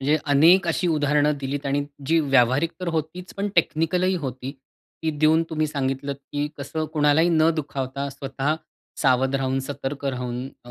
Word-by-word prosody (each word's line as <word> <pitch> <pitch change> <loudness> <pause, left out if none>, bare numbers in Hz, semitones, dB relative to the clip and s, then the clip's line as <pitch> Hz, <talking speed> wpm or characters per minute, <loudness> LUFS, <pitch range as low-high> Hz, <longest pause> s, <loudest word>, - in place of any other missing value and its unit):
म्हणजे 145 +3 +2 0.2
अनेक 175 +6 +6
अशी 170 +2 0
उदाहरणं 150 -1 +2
दिलीत 140 +1 -3
आणि 140 +1 0 0.2
जी 165 +2 +3
व्यावहारिक 135 +3 +3
तर 180 - -2
होतीच, 165 +4 -4
पण 200 +1 -2
टेक्निकल 165 +2 +2
ही 190 +1 +2
होती. 130 +1 -5 0.5
ती 160 - +1
देऊन 155 +2 +4
तुम्ही 155 -1 0
सांगितलत 140 -1 -2 0.2
की 145 0 0
कसं 155 +3 -3
कोणालाही 150 +2 +3
न 160 -1 +4
दुखावता 140 -2 -3
स्वतः 135 +2 -2 0.5
सावध 130 -1 +3
राहून, 135 0 0
सतर्क 140 +1 -5
राहून 125 -1 -3 0.2
अ, 120 - -12
145 Hz, 165 wpm, -24 LUFS, 135-160 Hz, 0.5 s, अनेक